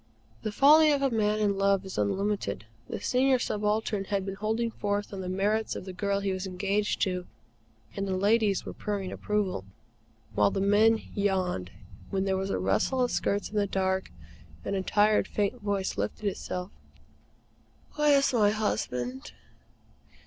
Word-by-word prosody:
The 215 - -3
folly 300 +6 +6
of 280 -1 +1
a 270 - +2
man 215 -2 +1
in 205 -2 +1
love 195 -1 +2
is 190 - -7
unlimited. 190 - -1 0.2
The - - -4
Senior 260 +1 +3
Subaltern 210 -3 -1
had 195 -1 -1
been 195 - -3
holding 220 +3 -1
forth 205 -1 -2
on 195 - -4
the 180 - -4
merits 210 +4 0
of - - -6
the 190 - -7
girl 200 +1 -1
he 195 -1 -1
was 185 +1 -4
engaged 200 +3 -1
to, 180 -2 -2 0.7
and 195 0 -2
the 190 -1 -1
ladies 205 0 +2
were - - -6
purring 200 -3 -3
approval, 205 - -1 0.7
while 105 -1 +4
the - - -2
men 210 +3 +4
yawned, 185 - 0 0.4
when 195 0 -1
there 190 -1 +1
was 190 +1 -2
a - - 0
rustle 95 - +1
of 245 - 0
skirts 200 0 -1
in 215 - -3
the 205 -1 +2
dark, 190 -1 -1 0.6
and - - -1
a 190 - 0
tired, 210 +2 +3
faint 210 +4 -1
voice 200 - -2
lifted 105 - -3
itself: 185 -1 -3 1.2
"Where's 290 -3 +3
my 210 -4 +4
husband?" 130 - -2
200 Hz, 165 wpm, -28 LUFS, 190-215 Hz, 1.2 s, folly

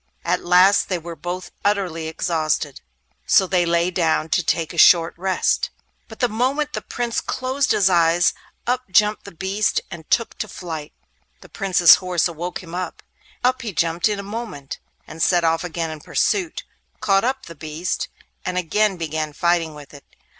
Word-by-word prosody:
At 180 +1 0
last 180 +3 +5
they 185 - 0
were 170 0 -8
both 175 +4 -6
utterly 185 -6 0
exhausted, 160 -3 -1 0.5
so 190 - +5
they 180 -2 +1
lay 170 +1 +2
down 165 -2 +1
to 180 - +2
take 165 +1 -1
a - - -10
short 165 -1 +6
rest. 185 +1 0 0.4
But 220 - -11
the 245 - +4
moment 265 +7 -1
the - - -3
Prince 240 -2 -2
closed 260 +1 -1
his 195 - +4
eyes, 170 -1 +4 0.3
up 250 -2 -1
jumped 210 +3 +3
the 200 - -9
beast 190 +3 0
and 165 -3 -9
took 230 -1 +1
to 215 - -2
flight. 160 -7 -7 0.5
The - - -15
Prince's 180 -3 +6
horse 180 -2 0
awoke 175 +3 -5
him; 165 -1 -11
up 180 +1 -5 0.6
he 220 -4 -5
jumped 170 +4 +1
in 210 - -1
a 200 - -5
moment, 200 - -6 0.3
and 160 - -9
set 175 +1 +3
off 165 +1 +1
again 165 -2 -3
in 155 - -7
pursuit, 350 - -1 0.4
caught 195 -1 +2
up 260 +2 -1
the 170 - -9
beast, 155 +3 -4 0.4
and 180 0 -3
again 195 +3 +1
began 155 -2 -3
fighting 170 -1 +1
with 145 -1 -12
it. 140 - -13
180 Hz, 175 wpm, -21 LUFS, 165-200 Hz, 0.6 s, short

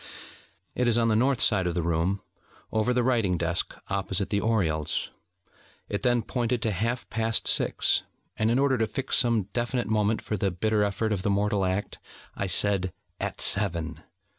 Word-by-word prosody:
It 125 - 0
is 120 -1 +3
on 115 -1 +3
the 110 - +3
north 130 +2 +2
side 95 -2 +3
of 85 - -2
the 85 - 0
room, 85 +4 0 0.5
over 110 +3 +1
the 125 0 +2
writing 115 -8 +2
desk 85 +1 -1
opposite 100 0 -2
the 100 -1 +1
oriels. 85 -9 0 0.8
It 100 - -2
then 120 -2 +2
pointed 120 -1 -1
to 110 - +1
half 115 +6 -2
past 115 0 0
six, - - +2 0.3
and 110 - +1
in 120 - +2
order 135 -2 +2
to 110 - +1
fix 135 +4 0
some 115 -4 +3
definite 120 0 -1
moment 110 0 +1
for 105 - -3
the 100 +1 +1
bitter 105 +4 0
effort 105 +2 0
of 100 -3 0
the 100 - -1
mortal 100 0 +1
act, 95 +2 -2 0.3
I 100 - -3
said: 95 -1 +1 0.3
'At - - -4
Seven.' 85 -5 0
105 Hz, 180 wpm, -27 LUFS, 95-115 Hz, 0.8 s, is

